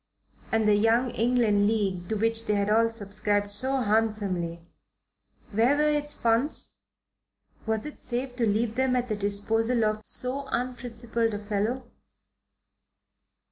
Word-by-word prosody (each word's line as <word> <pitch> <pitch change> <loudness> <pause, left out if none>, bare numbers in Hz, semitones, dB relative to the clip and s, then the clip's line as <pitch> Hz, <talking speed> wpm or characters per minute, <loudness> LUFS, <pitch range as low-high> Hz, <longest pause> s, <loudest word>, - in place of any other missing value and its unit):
And 220 -1 +2
the 210 - +5
Young 225 +4 +3
England 225 -3 +2
League 195 -5 -1
to 220 - 0
which 225 +1 0
they 210 - +2
had 200 +1 0
all 230 +1 +4
subscribed 205 -1 -1
so 260 +6 +1
handsomely 205 -6 0 0.9
where 235 +7 +3
were 300 - +2
its 295 -1 0
funds? 235 +6 +1 0.9
Was 220 +1 -1
it 300 - -8
safe 250 +1 -4
to 235 -3 +1
leave 215 +2 0
them 260 +1 +1
at 250 0 -1
the 215 - 0
disposal 220 +3 +1
of 215 0 -1
so 260 +3 0
unprincipled 235 -2 -2
a 205 0 -7
fellow? 220 +5 -2
225 Hz, 140 wpm, -27 LUFS, 205-245 Hz, 0.9 s, the